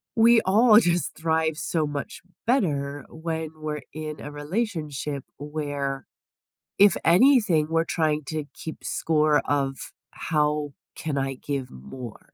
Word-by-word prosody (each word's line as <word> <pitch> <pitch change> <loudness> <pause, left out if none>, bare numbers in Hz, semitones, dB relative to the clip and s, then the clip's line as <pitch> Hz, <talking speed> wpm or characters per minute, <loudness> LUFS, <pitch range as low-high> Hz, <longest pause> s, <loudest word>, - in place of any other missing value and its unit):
we 230 +1 +6
all 215 +3 +6
just 175 -5 0
thrive 160 -1 0
so 155 -2 -1
much 145 -1 -5 0.2
better 145 - 0
when 160 -1 -4
we're 155 -1 -4
in 155 -1 -6
a 145 - -7
relationship 150 - -3
where, 145 -2 -4 0.7
if 200 0 +6
anything, 180 - +5
we're 165 0 +2
trying 155 -2 0
to 155 -1 -3
keep 160 - -7
score 155 -2 +2
of 135 -2 0 0.3
how 150 -2 -1 0.2
can 150 -3 -3
I 135 0 -1
give 135 -1 -4
more? 115 - -10
155 Hz, 125 wpm, -25 LUFS, 145-165 Hz, 0.7 s, we